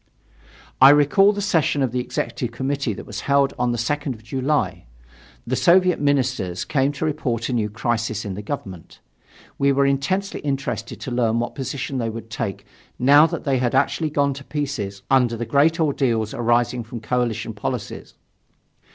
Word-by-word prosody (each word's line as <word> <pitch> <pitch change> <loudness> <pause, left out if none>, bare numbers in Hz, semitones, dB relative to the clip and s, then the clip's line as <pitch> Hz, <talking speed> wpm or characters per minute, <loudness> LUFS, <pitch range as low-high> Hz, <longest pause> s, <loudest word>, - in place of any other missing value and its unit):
I 135 - +10
recall 150 +8 +5
the 205 -1 -3
session 160 -7 +1
of 130 - 0
the 125 - -1
Executive 125 -1 -3
Committee 135 -2 -2
which - - -9
was 105 0 -6
held 140 -1 +2
on 125 0 +1
the 120 - -2
2nd 145 +3 -2
of 110 - -17
July. 135 - -1 0.6
The 130 - -1
Soviet 180 +4 +4
ministers 130 -11 0
came 135 -1 +1
to 150 - -3
report 130 -7 -2
a - - -1
new 110 -3 0
crisis 115 -1 -2
in 100 - -4
the 100 - -6
government. 100 - -7 0.6
We 140 0 +3
were 140 0 +3
intensely 140 +9 0
interested 130 -6 -3
to 130 - -5
learn 115 -2 +1
what 120 - -2
position 135 0 -4
they 115 -1 -1
would 115 0 -8
take 105 -6 -4 0.3
now 145 +5 +6
that - - -5
they 135 -4 +1
had 125 0 0
actually 150 +3 +1
gone 140 -1 +1
to 140 +1 -9
pieces 130 -10 -4
under 125 -3 +3
the 120 - -3
great 150 +6 +3
ordeals 125 -8 0
arising 120 +1 +1
from 115 +1 -8
coalition 120 0 -1
policies. - - -5
130 Hz, 175 wpm, -22 LUFS, 115-145 Hz, 0.6 s, I